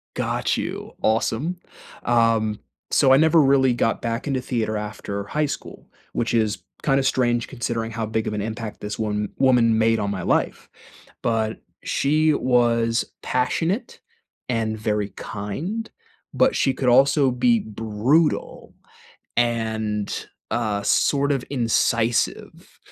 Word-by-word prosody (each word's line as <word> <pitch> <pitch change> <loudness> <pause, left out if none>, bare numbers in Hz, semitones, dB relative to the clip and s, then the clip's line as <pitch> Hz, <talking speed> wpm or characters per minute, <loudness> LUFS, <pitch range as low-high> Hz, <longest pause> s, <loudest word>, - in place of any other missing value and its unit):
Got - - -1
you. - - -5
Awesome. 115 +10 0 0.5
Um, 115 -3 +2 0.3
so 130 - +5
I - - +7
never 160 +2 +5
really 135 -2 +4
got 115 -1 0
back 115 +3 -3
into 135 -2 0
theater 115 -4 -2
after 100 -1 -5
high 150 +7 0
school, 140 -4 -7 0.3
which 115 - -1
is 105 -5 0 0.2
kinda 135 -2 +2
strange 120 -3 +1
considering 115 -3 -3
how 115 0 -3
big 110 0 -2
of - - -2
an 105 - -2
impact 110 0 -5
this 105 +1 -5
one 105 -1 -2
woman 120 -4 +4
made 115 0 +3
on 100 -1 -1
my 95 -3 -3
life. - - 0 0.5
But 110 -2 -1 0.2
she 155 +2 +2
was 120 -3 +2 0.2
passionate 165 - -1 0.5
and 115 -3 -1
very 105 -1 -1
kind, 145 - -5 0.4
but - - +3
she 135 - +2
could 130 -1 0
also 135 +2 +5
be 230 - +3
brutal, 115 - 0 0.6
and, 110 -3 -1 0.2
uh, 105 -3 -1
sort 140 +7 +2
of 135 -3 -1
incisive, 115 -2 0
115 Hz, 130 wpm, -23 LUFS, 110-135 Hz, 0.6 s, I